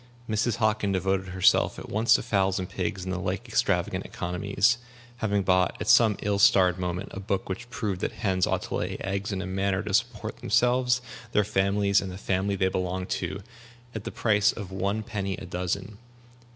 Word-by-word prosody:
Mrs. 110 +1 0
Hockin 110 -2 +1
devoted 95 0 0
herself 95 0 +3
at - - -8
once 110 +3 +3
to - - 0
fowls 95 -4 +1
and 95 - -3
pigs 95 -1 -3
and 95 0 -3
the 95 - -2
like 95 0 -3
extravagant - - 0
economies, 100 +7 0 0.4
having 105 -3 0
bought, 90 -1 +2
at - - -4
some 110 -4 +5
ill 100 -1 0
starred 90 -2 +5
moment, 90 0 -3
a - - -5
book 100 0 -2
which 115 +6 -5
proved 105 -6 -3
that - - -2
hens 95 -4 0
ought - - 0
to - - -6
lay - - -3
eggs 100 +2 -2
in 95 -1 -2
a - - -5
manner 95 +1 -1
to 105 -2 -4
support 110 0 -1
themselves, 125 +2 +2 0.3
their 105 - +4
families, 100 0 +2
and 95 - -5
the 90 - -7
family 100 +1 -1
they 95 -1 +1
belonged 90 0 -2
to, 95 +1 -3 0.5
at 110 - -5
the - - -5
price 105 -2 +3
of 100 -4 -8
one 100 +3 -1
penny 100 -4 -3
a - - -8
dozen. 95 +3 -4
100 Hz, 195 wpm, -27 LUFS, 95-105 Hz, 0.5 s, some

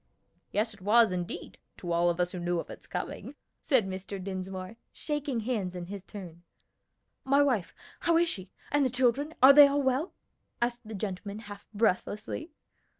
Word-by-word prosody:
"Yes, 220 +2 0
it 205 - -17
was, 220 +2 +5
indeed, 180 -1 -5 0.2
to 175 - -5
all 170 +1 +3
of 170 0 -1
us 180 0 +1
who 180 - -5
knew 175 0 0
of - - -6
its - - -11
coming," - - -5 0.2
said 260 -8 +2
Mr. 190 +1 -5
Dinsmore, 185 +2 -5
shaking 290 -5 -2
hands 210 -6 -2
in 175 -1 -5
his 200 +2 -7
turn. 180 -5 -10 0.8
"My 280 +2 +4
wife! 245 -11 0 0.2
how 335 -1 +3
is 340 +1 +4
she? 190 - -5 0.2
and 290 0 +3
the 260 - +2
children? 260 +5 +1
are 270 +1 +11
they 290 0 +10
all 280 0 +1
well?" 265 +6 0 0.5
asked 240 -1 -2
the 220 - -6
gentleman 200 0 -4
half 205 -2 -10
breathlessly. 215 - -1
210 Hz, 175 wpm, -29 LUFS, 185-260 Hz, 0.8 s, are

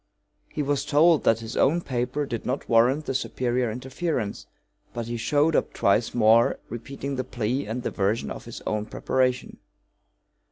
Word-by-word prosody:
He 150 - -2
was 140 0 0
told 150 +2 +4
that 115 0 +3
his 115 +1 -7
own 160 +6 +3
paper 130 +1 -2
did 120 -4 -4
not 130 +3 -3
warrant 125 +6 +3
the - - -2
superior 125 -2 -1
interference. 125 0 -3 0.5
But 120 -1 -3
he 120 +1 -4
showed 145 +7 +2
up - - 0
twice 100 +5 +1
more, 115 0 +4
repeating 135 +4 -5
the 130 - -1
plea 125 +1 -2
and 120 +3 -4
the - - -2
version 100 +3 -1
of - - -7
his 120 - -8
own 105 0 -2
preparation. 130 -1 -1
125 Hz, 165 wpm, -25 LUFS, 115-140 Hz, 0.5 s, told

